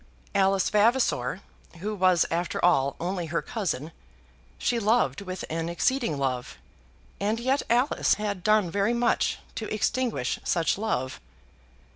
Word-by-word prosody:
Alice 195 Hz, -1 st, +3 dB
Vavasor, 210 Hz, -, +2 dB, 0.4 s
who 205 Hz, +5 st, -3 dB
was 185 Hz, -4 st, +3 dB
after 170 Hz, +1 st, -1 dB
all 140 Hz, -6 st, +3 dB
only 175 Hz, 0 st, -2 dB
her 165 Hz, +1 st, -1 dB
cousin, 170 Hz, -, -3 dB, 0.7 s
she 240 Hz, -, 0 dB
loved 210 Hz, -, +2 dB
with 185 Hz, -2 st, -5 dB
an 165 Hz, +1 st, -3 dB
exceeding 175 Hz, -, 0 dB
love, 130 Hz, -3 st, -2 dB, 0.6 s
and 215 Hz, +3 st, 0 dB
yet 260 Hz, +4 st, +1 dB
Alice 245 Hz, +5 st, +3 dB
had 205 Hz, -3 st, -3 dB
done 215 Hz, -4 st, +3 dB
very 200 Hz, +5 st, +1 dB
much 235 Hz, 0 st, +1 dB, 0.2 s
to 220 Hz, -1 st, -5 dB
extinguish 215 Hz, -, -1 dB
such 165 Hz, -2 st, +1 dB
love. 130 Hz, -, -2 dB
195 Hz, 130 wpm, -27 LUFS, 165-225 Hz, 0.7 s, Alice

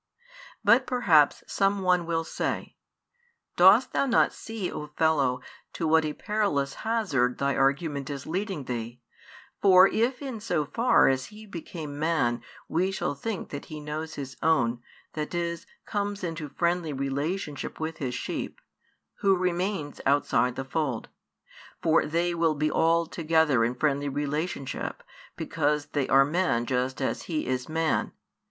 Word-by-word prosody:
But 255 Hz, +3 st, +5 dB
perhaps 175 Hz, -, +4 dB
some 195 Hz, 0 st, +1 dB
one 180 Hz, -2 st, +2 dB
will 165 Hz, -1 st, 0 dB
say, -, -, -3 dB, 0.8 s
"Dost -, -, +6 dB
thou 275 Hz, -, +2 dB
not 245 Hz, -, +3 dB
see, 225 Hz, -5 st, -5 dB
O 150 Hz, -, -6 dB
fellow, 145 Hz, -5 st, +1 dB, 0.3 s
to 165 Hz, -, -2 dB
what 160 Hz, 0 st, +4 dB
a 150 Hz, -, -2 dB
perilous 200 Hz, -11 st, -1 dB
hazard 160 Hz, -, +1 dB
thy 140 Hz, 0 st, 0 dB
argument 140 Hz, +1 st, 0 dB
is 140 Hz, -2 st, -5 dB
leading 185 Hz, -2 st, -3 dB
thee? 120 Hz, -1 st, -5 dB, 0.6 s
For 185 Hz, -2 st, +8 dB
if 245 Hz, +5 st, 0 dB
in 260 Hz, -5 st, -5 dB
so 205 Hz, -8 st, -1 dB
far 230 Hz, -, +4 dB
as 130 Hz, -1 st, +1 dB
He 215 Hz, +1 st, -12 dB
became 160 Hz, -6 st, -7 dB
Man 150 Hz, -7 st, +1 dB, 0.3 s
we 180 Hz, +3 st, +1 dB
shall 190 Hz, -6 st, -2 dB
think 200 Hz, +7 st, -5 dB
that 145 Hz, -, -6 dB
He 155 Hz, -, -8 dB
knows 150 Hz, +2 st, -5 dB
His 135 Hz, -2 st, -7 dB
own, 125 Hz, -7 st, +2 dB, 0.3 s
that 155 Hz, +2 st, -4 dB
is, 170 Hz, -1 st, -3 dB, 0.2 s
comes 205 Hz, -1 st, -3 dB
into 165 Hz, -3 st, -4 dB
friendly 170 Hz, -1 st, 0 dB
relationship 140 Hz, +3 st, -3 dB
with 160 Hz, 0 st, -4 dB
His 125 Hz, -3 st, -3 dB
sheep; -, -, -4 dB, 0.6 s
who 195 Hz, -1 st, +4 dB
remains 180 Hz, -3 st, -2 dB
outside 125 Hz, -3 st, +2 dB
the 135 Hz, -, -4 dB
fold? 135 Hz, -4 st, -2 dB, 0.7 s
For 160 Hz, -1 st, +3 dB
they 170 Hz, +3 st, 0 dB
will 165 Hz, -2 st, +1 dB
be 150 Hz, +1 st, 0 dB
all 165 Hz, +1 st, +3 dB
together 160 Hz, -6 st, +2 dB
in 120 Hz, +2 st, 0 dB
friendly 145 Hz, +1 st, 0 dB
relationship, 150 Hz, -, -3 dB, 0.3 s
because 150 Hz, -2 st, 0 dB
they 140 Hz, -3 st, 0 dB
are 135 Hz, +1 st, +6 dB
men 150 Hz, -7 st, +1 dB
just 130 Hz, +2 st, -1 dB
as -, -, -1 dB
He 155 Hz, -3 st, -1 dB
is 130 Hz, +1 st, -2 dB
Man. 160 Hz, 0 st, 0 dB
155 Hz, 150 wpm, -27 LUFS, 140-180 Hz, 0.8 s, For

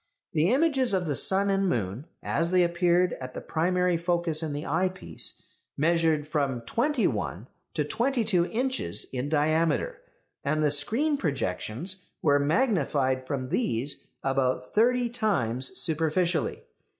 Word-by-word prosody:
The 160 Hz, +2 st, +2 dB
images 270 Hz, -5 st, +2 dB
of 180 Hz, -1 st, -1 dB
the 150 Hz, -3 st, -1 dB
sun 195 Hz, +5 st, +4 dB
and 195 Hz, -1 st, +1 dB
moon 115 Hz, -, -2 dB, 0.2 s
as 165 Hz, 0 st, 0 dB
they 180 Hz, 0 st, +4 dB
appeared 175 Hz, +1 st, +2 dB
at 130 Hz, 0 st, -7 dB
the -, -, -3 dB
primary 180 Hz, +1 st, 0 dB
focus 170 Hz, -2 st, 0 dB
in 160 Hz, -2 st, -3 dB
the 145 Hz, +2 st, -4 dB
eyepiece 180 Hz, +4 st, -2 dB, 0.3 s
measured 160 Hz, -1 st, +2 dB
from 140 Hz, -5 st, -1 dB
twenty 235 Hz, -, 0 dB
one 105 Hz, -, -2 dB, 0.3 s
to 155 Hz, -, +1 dB
twenty 240 Hz, -, 0 dB
two 180 Hz, -5 st, +2 dB
inches 260 Hz, +3 st, 0 dB
in 130 Hz, +2 st, -2 dB
diameter, 160 Hz, -, +1 dB, 0.4 s
and 155 Hz, +1 st, 0 dB
the 150 Hz, -, +3 dB
screen 235 Hz, -, +2 dB
projections 150 Hz, -, -3 dB, 0.2 s
were 145 Hz, -3 st, +4 dB
magnified 140 Hz, -, +1 dB
from 130 Hz, -2 st, -3 dB
these 140 Hz, -, -1 dB, 0.2 s
about 130 Hz, -1 st, 0 dB
thirty 245 Hz, +3 st, +3 dB
times 185 Hz, -, -1 dB
superficially. 165 Hz, 0 st, +1 dB
165 Hz, 140 wpm, -27 LUFS, 140-195 Hz, 0.4 s, sun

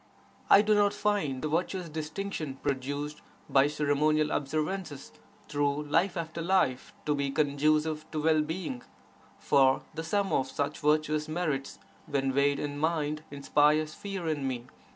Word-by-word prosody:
1 205 Hz, +1 st, +7 dB
do 215 Hz, -, +4 dB
not 205 Hz, 0 st, +3 dB
find 200 Hz, -11 st, 0 dB
the -, -, 0 dB
virtuous 175 Hz, +3 st, -1 dB
distinction 155 Hz, -1 st, -4 dB
produced 145 Hz, +2 st, -3 dB, 0.3 s
(by 135 Hz, +1 st, +4 dB
ceremonial 150 Hz, +1 st, +1 dB
observances) 155 Hz, +1 st, -3 dB, 0.4 s
through 145 Hz, 0 st, 0 dB
life 170 Hz, +5 st, +1 dB
after 165 Hz, 0 st, -4 dB
life 170 Hz, -3 st, +1 dB
to 150 Hz, -, +2 dB
be 140 Hz, -1 st, -1 dB
conducive 155 Hz, +2 st, +1 dB
to 155 Hz, -, -3 dB
well 155 Hz, 0 st, +3 dB
being, 185 Hz, -, -4 dB, 0.6 s
for 135 Hz, -1 st, +3 dB
the 160 Hz, +1 st, -4 dB
sum 200 Hz, +4 st, 0 dB
of 130 Hz, 0 st, +1 dB
such 145 Hz, +2 st, -2 dB
virtuous 155 Hz, 0 st, +1 dB
merits 155 Hz, -4 st, -2 dB, 0.3 s
when 135 Hz, -2 st, 0 dB
weighed 140 Hz, +1 st, +3 dB
in 145 Hz, 0 st, -4 dB
mind 155 Hz, -1 st, 0 dB
inspires 150 Hz, +2 st, +2 dB
fear 195 Hz, -3 st, -5 dB
in 145 Hz, -4 st, -1 dB
me. 125 Hz, -2 st, -3 dB
150 Hz, 145 wpm, -29 LUFS, 145-165 Hz, 0.6 s, 1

